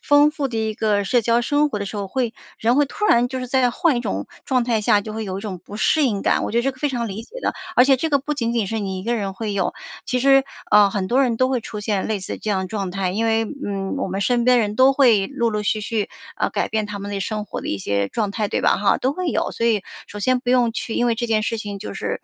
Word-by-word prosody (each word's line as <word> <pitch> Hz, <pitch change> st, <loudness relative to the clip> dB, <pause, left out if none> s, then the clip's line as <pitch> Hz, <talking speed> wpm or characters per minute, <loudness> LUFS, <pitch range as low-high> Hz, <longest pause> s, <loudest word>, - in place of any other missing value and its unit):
丰 290 Hz, +1 st, +5 dB
富 295 Hz, -3 st, -2 dB
的 230 Hz, -, -5 dB
一 220 Hz, -1 st, -1 dB
个 210 Hz, -2 st, +1 dB
社 240 Hz, +5 st, +2 dB
交 235 Hz, +1 st, +2 dB
生 290 Hz, +4 st, +2 dB
活 215 Hz, -, -3 dB
的 200 Hz, -, -4 dB
时 210 Hz, -, -6 dB
候， 200 Hz, -1 st, -3 dB
会 245 Hz, +1 st, -1 dB, 0.3 s
人 235 Hz, +3 st, +2 dB
会 290 Hz, -, +5 dB
突 420 Hz, -, -4 dB
然 240 Hz, -6 st, +4 dB
就 260 Hz, +1 st, -4 dB
是 255 Hz, -, -4 dB
在 255 Hz, -1 st, +3 dB
换 300 Hz, +2 st, +2 dB
一 -, -, 0 dB
种 100 Hz, -, -3 dB, 0.2 s
状 255 Hz, -2 st, +1 dB
态 230 Hz, -2 st, +1 dB
下， 205 Hz, 0 st, +4 dB
就 215 Hz, +1 st, -7 dB
会 220 Hz, 0 st, -3 dB
有 190 Hz, -1 st, -4 dB
一 -, -, -6 dB
种 200 Hz, -3 st, -5 dB
不 205 Hz, -, -8 dB
适 305 Hz, +7 st, +3 dB
应 210 Hz, -7 st, 0 dB
感， -, -, +1 dB
我 -, -, -3 dB
觉 235 Hz, -, +2 dB
得 235 Hz, -, +2 dB
这 270 Hz, -, +1 dB
可 260 Hz, -, -19 dB
非 295 Hz, -, 0 dB
常 240 Hz, -3 st, -2 dB
理 205 Hz, +3 st, -6 dB
解 235 Hz, -, -19 dB
的。 -, -, -1 dB, 0.2 s
而 250 Hz, -, +6 dB
且 270 Hz, -1 st, +5 dB
这 320 Hz, +5 st, -2 dB
个 280 Hz, -, +4 dB
不 295 Hz, +2 st, -3 dB
仅 235 Hz, -5 st, -1 dB
仅 230 Hz, -4 st, 0 dB
是 225 Hz, +3 st, -2 dB
你 190 Hz, -2 st, -3 dB
一 -, -, -6 dB
个 235 Hz, +4 st, 0 dB
人 200 Hz, -3 st, -3 dB
会 210 Hz, +1 st, -4 dB
有， 190 Hz, -3 st, 0 dB, 0.3 s
其 250 Hz, -, -1 dB
实， 270 Hz, +1 st, +5 dB, 0.3 s
呃， 210 Hz, -1 st, +6 dB
很 195 Hz, -1 st, -2 dB
多 255 Hz, +6 st, +3 dB
人 240 Hz, -4 st, 0 dB
都 255 Hz, -, +3 dB
会 260 Hz, -2 st, 0 dB
出 210 Hz, -, -6 dB
现 205 Hz, -2 st, -1 dB
类 215 Hz, -2 st, -2 dB
似 185 Hz, -, -5 dB
的 -, -, -9 dB
这 215 Hz, -, -3 dB
样 190 Hz, -2 st, -1 dB
状 195 Hz, -2 st, -3 dB
态。 185 Hz, 0 st, -1 dB
因 220 Hz, +3 st, -1 dB
为， 225 Hz, 0 st, +2 dB, 0.2 s
嗯， 195 Hz, +3 st, -3 dB
我 270 Hz, -, -2 dB
们 190 Hz, +1 st, -3 dB
身 240 Hz, +3 st, +1 dB
边 250 Hz, 0 st, +5 dB
人 210 Hz, -2 st, -1 dB
都 260 Hz, +1 st, +6 dB
会 235 Hz, -8 st, +4 dB
陆 240 Hz, -2 st, -1 dB
陆 210 Hz, -1 st, -2 dB
续 215 Hz, +1 st, 0 dB
续， 210 Hz, 0 st, -2 dB, 0.3 s
呃， -, -, 0 dB
改 -, -, -1 dB
变 220 Hz, -1 st, -1 dB
他 205 Hz, -1 st, -6 dB
们 200 Hz, +1 st, -6 dB
的 200 Hz, -, -2 dB
生 210 Hz, +2 st, -3 dB
活 -, -, -6 dB
的 -, -, -5 dB
一 100 Hz, -, -2 dB
些 100 Hz, +1 st, -1 dB
状 210 Hz, -, -1 dB
态， 210 Hz, +1 st, -1 dB
对 -, -, -1 dB
吧 -, -, +3 dB
哈， 200 Hz, 0 st, +2 dB
都 265 Hz, +2 st, 0 dB
会 365 Hz, 0 st, -2 dB
有。 -, -, -1 dB
所 230 Hz, -, -1 dB
以 215 Hz, -4 st, +2 dB, 0.2 s
首 205 Hz, -, -9 dB
先 255 Hz, +4 st, +2 dB
不 245 Hz, 0 st, -2 dB
用 245 Hz, -2 st, +4 dB
去， 225 Hz, 0 st, -4 dB
因 240 Hz, -, +1 dB
为 235 Hz, -, +2 dB
这 240 Hz, +1 st, -2 dB
件 220 Hz, -2 st, +1 dB
事 230 Hz, +1 st, -1 dB
情 205 Hz, -2 st, -5 dB
就 210 Hz, -, -7 dB
是 -, -, -3 dB
225 Hz, 335 characters per minute, -21 LUFS, 205-250 Hz, 0.3 s, 而